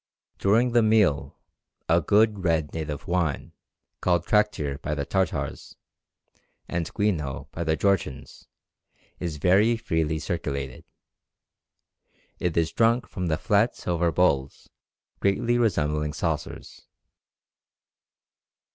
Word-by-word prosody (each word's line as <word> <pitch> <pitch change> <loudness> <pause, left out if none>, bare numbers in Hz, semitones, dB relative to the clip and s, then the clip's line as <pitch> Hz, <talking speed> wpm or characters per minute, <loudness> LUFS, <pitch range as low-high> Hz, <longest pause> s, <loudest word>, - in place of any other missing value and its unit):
During 115 +5 +3
the 120 0 +4
meal 110 -9 +2 0.5
a 85 +1 +4
good 105 +3 +2
red 80 -3 0
native 75 -3 -5
wine, 85 -5 -1 0.5
called 85 -2 +1
traktir 80 -10 +1
by 75 - -2
the 70 -1 -3
Tartars, 95 +4 -2 0.9
and 85 -2 -3
ghwino 75 - -1
by 85 - -4
the 80 -1 +1
Georgians, 95 -7 -2 0.7
is 85 -4 -4
very 100 +9 +3
freely 80 -6 -1
circulated. 70 -6 -4 1.5
It 90 -2 -1
is 80 -1 +2
drunk 115 +2 +2
from 90 -2 -4
flat 105 +7 +2
silver 85 -1 0
bowls 70 -6 0 0.5
greatly 120 +5 +1
resembling 75 -9 0
saucers. 80 -2 -4
85 Hz, 100 wpm, -25 LUFS, 75-100 Hz, 1.5 s, the